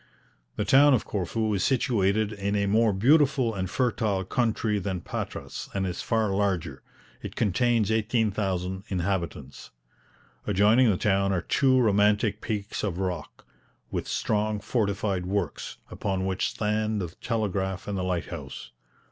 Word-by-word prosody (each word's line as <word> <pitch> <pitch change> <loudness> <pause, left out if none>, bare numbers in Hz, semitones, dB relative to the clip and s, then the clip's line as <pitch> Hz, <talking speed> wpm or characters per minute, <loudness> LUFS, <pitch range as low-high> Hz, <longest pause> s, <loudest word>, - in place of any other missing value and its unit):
The - - -1
town 140 +1 +6
of 115 - -2
Corfu 105 +3 -1
is 95 - 0
situated 110 -5 +1
in 100 0 -2
a 100 -1 +1
more 110 +2 +3
beautiful 130 +3 +3
and 95 -2 -3
fertile 110 -5 0
country 110 -1 0
than 95 -2 -3
Patras, - - -6
and 95 -1 0
is 90 -1 -3
far 110 -3 0
larger. 90 -9 -1 0.4
It - - -7
contains 115 +1 +2
18,000 100 -4 0
inhabitants. 85 -7 -3 0.8
Adjoining 105 +5 +4
the 95 - +2
town 100 0 +1
are 90 -3 0
two 130 +5 +3
romantic 105 -1 +2
peaks 105 -1 -3
of 95 -5 -2
rock, 90 -5 -4 0.5
with - - -3
strong 105 0 0
fortified 100 -4 -1
works, 95 -6 -3
upon 95 -1 -2
which 95 0 0
stand 105 0 -1
the 90 -3 -3
telegraph 95 -4 -2
and 100 - -2
the 95 - -2
lighthouse. 90 -2 -4
100 Hz, 140 wpm, -27 LUFS, 95-110 Hz, 0.8 s, town